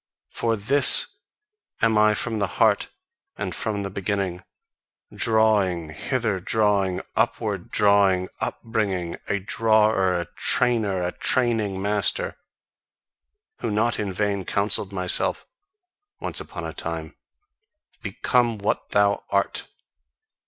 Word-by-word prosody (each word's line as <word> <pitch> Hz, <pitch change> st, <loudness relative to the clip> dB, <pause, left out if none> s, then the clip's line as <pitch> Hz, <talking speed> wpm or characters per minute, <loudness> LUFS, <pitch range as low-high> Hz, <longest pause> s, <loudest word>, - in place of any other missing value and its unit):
For 115 Hz, -1 st, 0 dB
THIS 130 Hz, +7 st, +4 dB, 0.6 s
am 115 Hz, -1 st, +3 dB
I 105 Hz, 0 st, +4 dB
from 110 Hz, 0 st, -2 dB
the 100 Hz, -, +1 dB
heart -, -, +3 dB, 0.5 s
and -, -, -4 dB
from 105 Hz, -2 st, -3 dB
the 100 Hz, -, -5 dB
beginning 95 Hz, -2 st, -2 dB, 0.7 s
drawing, 105 Hz, -7 st, +2 dB
hither 110 Hz, -, -2 dB
drawing, 100 Hz, -2 st, +1 dB
upward 100 Hz, -5 st, -1 dB
drawing, 100 Hz, -3 st, +3 dB
upbringing; 100 Hz, -7 st, -2 dB
a 100 Hz, -, 0 dB
drawer, 105 Hz, -2 st, +2 dB
a 85 Hz, -, -3 dB
trainer, 110 Hz, -7 st, +1 dB
a 90 Hz, -, -1 dB
training 110 Hz, -6 st, +1 dB
master, 105 Hz, -, -1 dB, 1.2 s
who -, -, -2 dB
not 110 Hz, +3 st, 0 dB
in 105 Hz, -2 st, -2 dB
vain 100 Hz, 0 st, -1 dB
counselled 100 Hz, +1 st, -1 dB
himself 90 Hz, -2 st, 0 dB, 0.7 s
once -, -, -3 dB
on -, -, -7 dB
a -, -, -5 dB
time: -, -, -6 dB, 0.9 s
"Become 115 Hz, +2 st, +1 dB
what 100 Hz, 0 st, -2 dB
thou 100 Hz, 0 st, +2 dB
art!" 100 Hz, 0 st, 0 dB
100 Hz, 110 wpm, -24 LUFS, 95-110 Hz, 1.2 s, THIS